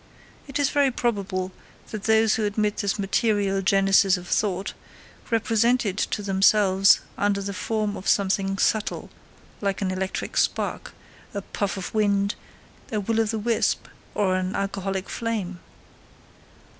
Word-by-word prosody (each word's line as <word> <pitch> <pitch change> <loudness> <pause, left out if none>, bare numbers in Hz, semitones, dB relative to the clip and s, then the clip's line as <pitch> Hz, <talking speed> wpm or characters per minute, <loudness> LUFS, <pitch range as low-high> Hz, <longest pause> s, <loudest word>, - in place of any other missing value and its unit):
It 275 0 -3
is 285 -1 +1
very 285 -2 +3
probable 200 -7 -2 0.4
that 215 -2 -5
those 220 -1 +4
who 220 - 0
admit 210 0 0
this 200 0 -1
material 200 -1 +1
genesis 195 0 +4
of 180 0 -10
thought, 195 0 0 0.6
represent 230 +1 +2
it 195 -3 -1
to 210 -1 -1
themselves 195 0 +4 0.2
under 205 -1 +1
the 200 0 -4
form 210 0 -2
of 185 - -7
something 195 0 +1
subtle, 215 +1 0 0.5
like 200 -1 -1
an 190 -2 -1
electric 190 0 -3
spark, - - -1 0.4
a 200 - -3
puff 200 0 -3
of 190 - -6
wind, 200 -2 +2 0.6
a 215 - 0
will 225 +3 0
of 220 -1 +1
the 225 - -1
wisp, 225 +1 0 0.3
or 190 -3 +2
an 185 +1 -2
alcoholic 195 -1 -2
flame. 210 -6 -3
200 Hz, 145 wpm, -24 LUFS, 195-220 Hz, 0.6 s, those